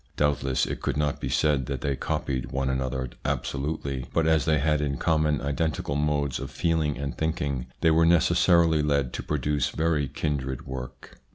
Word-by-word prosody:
Doubtless 70 -3 +1
it - - -5
could - - -1
not 75 -1 -1
be - - -2
said 70 -5 +1
that 70 -3 -3
they 70 -2 0
copied 65 0 -2
one 65 0 0
another 65 -1 -2 0.2
absolutely, 70 -1 -2
but 80 - +3
as 80 -2 +3
they 80 -1 +3
had 75 +1 +1
in 70 -2 -1
common 75 -1 +1
identical 70 0 -1
modes 75 -2 0
of 70 - -5
feeling 80 -3 0
and 70 0 -4
thinking, 70 -5 -2
they 80 - +5
were 80 +1 +4
necessarily 85 -1 +4
led 70 -4 0
to - - -3
produce 75 0 0
very 80 -3 0
kindred 65 -3 -3
work. 65 -1 -8
70 Hz, 175 wpm, -26 LUFS, 65-80 Hz, 0.2 s, they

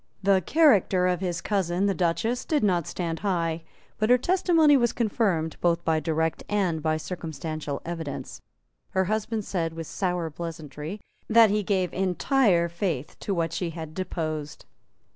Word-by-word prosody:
The 195 -1 +4
character 205 - +4
of 180 -1 +1
his 175 -3 -2
cousin 190 -2 0
the 200 - +2
Duchess 190 +8 0
did 300 -6 0
not 180 -5 +2
stand 165 -2 -3
high; 170 -5 -1 0.4
but 215 +1 +1
her 250 - +7
testimony 330 -1 +4
was 240 -3 +2
confirmed 195 -8 0
both 170 -1 +1
by 160 -1 +2
direct 160 +1 -1
and 185 -6 0
by 155 0 +1
circumstantial 155 -3 -5
evidence. 165 -3 -6 0.6
Her 190 - +4
husband 215 +2 -2
said, 165 -4 -2
with 165 0 -6
sour 180 -2 -2
pleasantry, 160 +3 -7 0.3
that 225 -2 +6
he 210 0 +1
gave 190 -3 0
entire 190 - +2
faith 170 -5 -3
to 200 - -2
what 165 -1 -1
she 175 0 -2
had 160 -1 -7
deposed. 155 -4 -4
180 Hz, 155 wpm, -26 LUFS, 165-205 Hz, 0.6 s, her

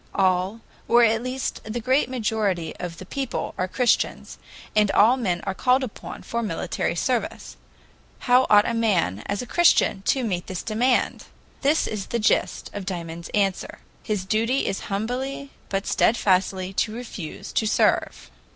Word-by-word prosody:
All 190 +3 +1 0.3
or 240 +1 +5
at 225 0 +3
least 255 +1 -3
the 220 +2 -4
great 260 +4 +2
majority 215 -8 -1
of 170 -1 -6
the 185 - -9
people 270 +6 -3
are 185 -1 -1
Christians, 245 +5 0 0.4
and 210 -1 +4
all 225 +6 +5
men 185 -9 -1
are 195 - -2
called 255 +6 +2
upon 245 - -7
for 235 - -3
military 215 - -2
service. - - -2 0.7
How 250 +1 +4
ought 205 0 +6
a 235 - -1
man, 190 - +1
as 200 +3 -2
a - - -7
Christian, 345 - +3
to 265 - +2
meet 180 -6 -2
this 185 -1 -5
demand? 240 +3 +1 0.4
This 295 +3 +2
is 210 -3 -4
the 235 - -1
gist 215 -2 0
of 205 - -5
Dymond's 170 -2 -5
answer: 195 -2 0 0.2
"His 210 -3 -2
duty 230 +6 +1
is 195 - -1
humbly 255 +7 -3 0.2
but 195 0 -2
steadfastly 190 -3 +1
to 215 +3 -1
refuse 220 -9 -7
to 220 - +1
serve." - - +1
215 Hz, 160 wpm, -24 LUFS, 190-245 Hz, 0.7 s, ought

